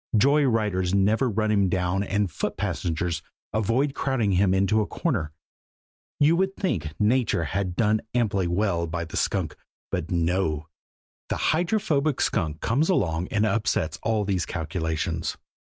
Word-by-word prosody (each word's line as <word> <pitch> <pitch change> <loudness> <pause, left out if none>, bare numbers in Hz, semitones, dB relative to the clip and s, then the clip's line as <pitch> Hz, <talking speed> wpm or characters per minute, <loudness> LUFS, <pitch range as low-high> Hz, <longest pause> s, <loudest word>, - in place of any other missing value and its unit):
Joy 140 +6 +4
riders 100 -6 +1
never 110 +6 +3
run 110 0 0
him 100 -3 +3
down 90 +1 0
and 100 -2 0
foot 75 - -3
passengers 85 0 -2 0.3
avoid 115 +7 +1
crowding 130 -8 0
him 95 +1 +3
into 100 +3 +3
a 105 - -2
corner. 105 - -1 0.9
You 150 +3 +5
would 190 +1 0
think 80 - -2
Nature 110 -4 +2
had 95 +3 -2
done 110 0 +2
amply 100 -6 +1
well 85 -2 0
by 85 +1 -3
the 80 - -9
skunk; - - -1 0.4
but 90 -3 -2
no 85 -3 0 0.6
the - - -1 0.2
Hydrophobic 160 - +1
Skunk 80 -6 0
comes 140 +9 +1
along 90 - +1
and 105 0 +1
upsets 95 -6 0
all 110 -2 0
these 95 -1 -1
calculations. 80 -3 -2
100 Hz, 145 wpm, -25 LUFS, 85-115 Hz, 0.9 s, You